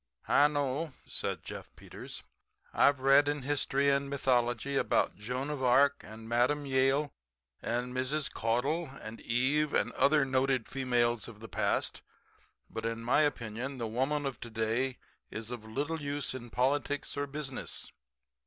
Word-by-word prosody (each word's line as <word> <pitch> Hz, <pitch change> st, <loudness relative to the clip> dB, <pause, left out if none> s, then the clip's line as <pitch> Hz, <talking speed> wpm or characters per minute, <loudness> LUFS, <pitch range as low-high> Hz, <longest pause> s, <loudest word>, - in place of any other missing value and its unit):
"I 145 Hz, -, +6 dB
know," 145 Hz, +1 st, -1 dB
said -, -, -3 dB
Jeff -, -, -7 dB
Peters. -, -, -9 dB, 0.5 s
"I've 140 Hz, -2 st, +4 dB
read 135 Hz, +2 st, +6 dB
in 145 Hz, -2 st, -1 dB
history 140 Hz, 0 st, +2 dB
and 140 Hz, 0 st, +1 dB
mythology 125 Hz, -1 st, +1 dB
about 135 Hz, -, +2 dB
Joan 125 Hz, +8 st, -3 dB
of 145 Hz, -3 st, -4 dB
Arc 140 Hz, +3 st, +4 dB
and 110 Hz, +1 st, -10 dB
Mme. 125 Hz, +5 st, +2 dB
Yale 135 Hz, +2 st, +2 dB, 0.5 s
and 125 Hz, +2 st, -2 dB
Mrs. 130 Hz, +3 st, -1 dB
Caudle 135 Hz, +9 st, 0 dB
and 110 Hz, +1 st, -8 dB
Eve 140 Hz, +6 st, +1 dB
and -, -, +2 dB
other 150 Hz, -1 st, +4 dB
noted 130 Hz, -2 st, +1 dB
females 120 Hz, -3 st, +1 dB
of 115 Hz, -3 st, -11 dB
the 115 Hz, -, -8 dB
past. -, -, 0 dB, 0.7 s
But, 115 Hz, -, -6 dB
in 115 Hz, 0 st, -3 dB
my 125 Hz, +6 st, +4 dB
opinion, 130 Hz, -2 st, -2 dB
the 120 Hz, -, -2 dB
woman 135 Hz, +6 st, 0 dB
of 135 Hz, -2 st, -3 dB
to 120 Hz, -, -7 dB
day 115 Hz, +4 st, 0 dB, 0.3 s
is 110 Hz, +1 st, -6 dB
of 120 Hz, -3 st, -6 dB
little 145 Hz, +8 st, -2 dB
use 145 Hz, -1 st, -2 dB
in 120 Hz, -2 st, -7 dB
politics 145 Hz, +4 st, 0 dB
or 145 Hz, 0 st, -1 dB
business. 140 Hz, -2 st, -5 dB
130 Hz, 155 wpm, -31 LUFS, 120-145 Hz, 0.7 s, I